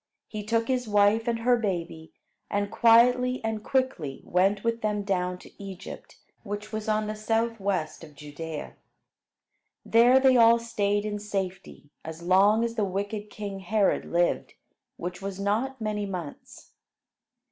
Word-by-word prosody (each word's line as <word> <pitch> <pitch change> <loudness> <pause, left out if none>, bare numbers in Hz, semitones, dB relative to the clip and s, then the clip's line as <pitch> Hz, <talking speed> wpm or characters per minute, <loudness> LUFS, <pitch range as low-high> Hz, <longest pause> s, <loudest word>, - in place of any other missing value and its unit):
He 215 -1 -6
took 230 +2 0
his 250 -2 -1
wife 210 +2 +3
and 235 -1 +1
her 245 +1 +4
baby, 170 -7 -4 0.4
and 205 0 -1
quietly 250 +2 +4
and 220 -1 -3
quickly 255 - -1
went 195 +3 +1
with 230 0 -1
them 210 -1 -1
down 180 -2 -1
to 200 - -14
Egypt, 190 -1 -9 0.2
which 205 0 -6
was 220 0 -4
on 215 0 +1
the 215 - -3
southwest 215 -7 -1
of 150 -2 -13
Judea. 150 +2 -7 1.1
There 240 +3 +6
they 260 -1 +5
all 230 0 +7
stayed 205 -3 -1
in 210 -1 -3
safety, 190 -7 -5
as 160 +1 -8
long 200 +5 +4
as 235 -1 -1
the 220 -2 -1
wicked 205 +2 -3
king 200 -2 -6
Herod 200 +2 +1
lived, 175 0 0 0.4
which 180 +2 -6
was 195 0 -5
not 225 +7 -1
many 210 -2 -2
months. 175 -6 -8
205 Hz, 145 wpm, -27 LUFS, 190-230 Hz, 1.1 s, all